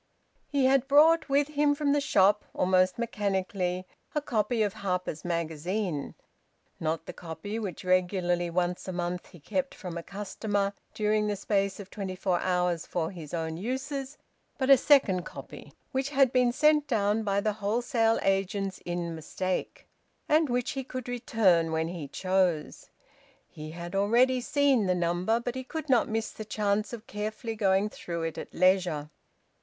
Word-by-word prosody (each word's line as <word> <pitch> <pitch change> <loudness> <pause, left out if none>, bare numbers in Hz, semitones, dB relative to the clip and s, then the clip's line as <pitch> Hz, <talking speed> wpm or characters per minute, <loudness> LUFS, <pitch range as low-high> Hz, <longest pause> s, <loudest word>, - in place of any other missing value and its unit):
He 280 -2 +1
had 270 0 +3
brought 310 +3 +5
with 280 +1 +2
him 290 -1 +2
from 285 -1 +1
the 290 - +2
shop, 205 -5 +4
almost 185 0 +3
mechanically, 190 -5 -1 0.3
a - - +3
copy 220 -3 0
of 205 -2 -1
"Harper's 180 -5 -3
Magazine," 170 0 -2 0.6
not 160 0 -2
the - - -7
copy 175 +6 -6
which 195 -3 -5
regularly 180 -1 +1
once 175 +1 -1
a - - -2
month 175 0 -3
he 175 - -15
kept 275 - -2
from 175 -3 -6
a - - -5
customer 200 +1 -2 0.2
during 210 0 +1
the 205 - 0
space 195 0 0
of 200 -1 -9
twenty 190 -3 -4
four 185 -1 0
hours 180 -2 0
for 165 -2 -2
his 165 -6 -9
own 160 -1 -3
uses, 270 - -4 0.4
but 270 0 +2
a - - +11
second 250 -10 +4
copy - - -10 0.2
which 265 +1 -1
had 275 -3 +3
been 250 -1 +4
sent 300 +3 +3
down 215 -3 +1
by 200 -2 +1
the 210 +1 0
wholesale 225 +2 +1
agents 195 0 0
in 175 -1 -3
mistake, 185 +4 -4 0.4
and 305 -1 +3
which 245 0 0
he 270 - -3
could 255 -1 -6
return 205 -9 +2
when 160 0 0
he 170 -5 -6
chose. 185 -1 0 0.6
He 155 0 -9
had 170 +2 -7
already 240 +6 +3
seen 280 -5 +2
the 180 - +2
number, 175 +6 +1
but 240 0 -3
he 260 0 -5
could 310 +3 -6
not 245 -3 +3
miss 220 0 -2
the 215 - -7
chance 210 0 -1
of 230 -2 -8
carefully 215 +2 -4
going 195 -1 +2
through 170 -4 -5
it 165 -1 -3
at - - -8
leisure. 180 -5 +2
200 Hz, 165 wpm, -28 LUFS, 180-245 Hz, 0.6 s, a